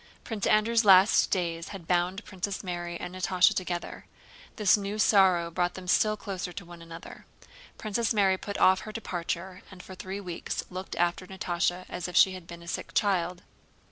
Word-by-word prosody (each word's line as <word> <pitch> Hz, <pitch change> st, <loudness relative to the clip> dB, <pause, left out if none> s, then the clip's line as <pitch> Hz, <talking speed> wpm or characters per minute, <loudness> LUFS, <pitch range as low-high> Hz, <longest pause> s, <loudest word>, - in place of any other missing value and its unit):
Prince 215 Hz, -4 st, -3 dB
Andrew's 220 Hz, +2 st, +3 dB
last 195 Hz, 0 st, +6 dB
days 170 Hz, -3 st, -2 dB
had 190 Hz, -5 st, -9 dB
bound 180 Hz, +3 st, 0 dB
Princess 195 Hz, +1 st, -4 dB
Mary 175 Hz, -2 st, -4 dB
and 180 Hz, 0 st, -6 dB
Natásha 185 Hz, 0 st, +3 dB
together; 175 Hz, -2 st, -4 dB, 0.5 s
this 210 Hz, -1 st, +4 dB
new 205 Hz, 0 st, -4 dB
sorrow 185 Hz, -5 st, +4 dB
brought 175 Hz, +1 st, -1 dB
them 185 Hz, -1 st, -9 dB
still 215 Hz, +4 st, +3 dB
closer 190 Hz, -3 st, -5 dB
to 175 Hz, +1 st, -8 dB
one 170 Hz, 0 st, -12 dB
another. 165 Hz, 0 st, -11 dB, 0.5 s
Princess 220 Hz, +1 st, -1 dB
Mary 200 Hz, -4 st, +3 dB
put 200 Hz, -, -5 dB
off 185 Hz, 0 st, +5 dB
her 215 Hz, -, -8 dB
departure, 185 Hz, -3 st, -4 dB
and 185 Hz, -1 st, -12 dB
for 190 Hz, -, -10 dB
three 190 Hz, +2 st, -6 dB
weeks 180 Hz, -4 st, -4 dB
looked 185 Hz, +1 st, -6 dB
after 175 Hz, +2 st, 0 dB
Natásha 180 Hz, -1 st, -2 dB
as 180 Hz, 0 st, -5 dB
if 180 Hz, -, -8 dB
she 190 Hz, -, +6 dB
had 185 Hz, -2 st, -9 dB
been 170 Hz, -1 st, -10 dB
a -, -, -14 dB
sick -, -, -5 dB
child. 180 Hz, -3 st, 0 dB
185 Hz, 180 wpm, -28 LUFS, 175-200 Hz, 0.5 s, last